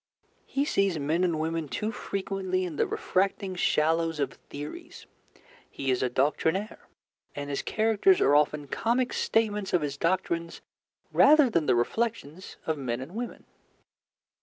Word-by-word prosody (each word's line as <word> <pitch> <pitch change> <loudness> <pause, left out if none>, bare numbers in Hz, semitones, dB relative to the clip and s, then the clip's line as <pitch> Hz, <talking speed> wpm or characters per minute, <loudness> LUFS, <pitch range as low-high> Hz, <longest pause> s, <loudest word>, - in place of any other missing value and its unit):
He 280 +1 0
sees 195 - +1
men 155 +5 0
and 170 -4 +1
women 160 0 -2
too 215 +9 -3
frequently 190 -3 -2
in 170 -4 -5
the - - +1
refracting 190 0 -1
shallows 165 -2 +1
of 140 - -1
theories. 320 - -9 0.6
He 135 -1 -2
is 125 - 0
a 130 - +1
doctrinaire, 160 - -1 0.5
and 145 0 -5
his 140 - -1
characters 225 - +3
are 145 - +4
often 150 0 +2
comic 240 - 0
statements 210 -3 0
of 175 -4 +3
his 145 -1 -3
doctrines 170 0 -1 0.5
rather 295 -3 +6
than 165 -6 +1
the 125 - +4
reflections 185 - -2
of 160 -2 -1
men 120 -3 -2
and 135 +7 -8
women. 235 +2 -6
170 Hz, 145 wpm, -28 LUFS, 150-210 Hz, 0.6 s, rather